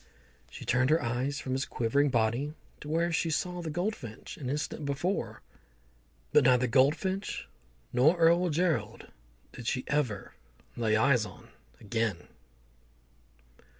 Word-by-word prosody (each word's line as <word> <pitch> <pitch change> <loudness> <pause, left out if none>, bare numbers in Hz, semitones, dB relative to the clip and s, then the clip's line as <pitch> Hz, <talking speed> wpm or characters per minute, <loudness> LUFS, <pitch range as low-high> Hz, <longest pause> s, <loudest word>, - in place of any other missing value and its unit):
She - - -9
turned 130 +2 +2
her 160 +2 +4
eyes 130 +4 -2
from 130 - -5
his 135 +1 0
quivering 140 +5 +1
body 120 +5 0 0.2
to 150 - -9
where 165 +2 +1
she 165 0 0
saw 180 +3 -1
the 165 - -4
goldfinch 155 - -4
an 130 -4 -5
instant 150 +2 -3
before, 140 - -2 0.9
but - - +6
neither 125 0 +5
goldfinch 150 - +1 0.5
nor 145 +8 +4
Earl 170 +2 +4
Gerald 165 +1 -1 0.4
did 120 - -8
she 130 -1 0
ever 125 -10 -1 0.4
lay 110 -2 +1
eyes 125 0 +4
on 105 - -11 0.3
again. 110 -3 -1
140 Hz, 130 wpm, -30 LUFS, 120-165 Hz, 0.9 s, but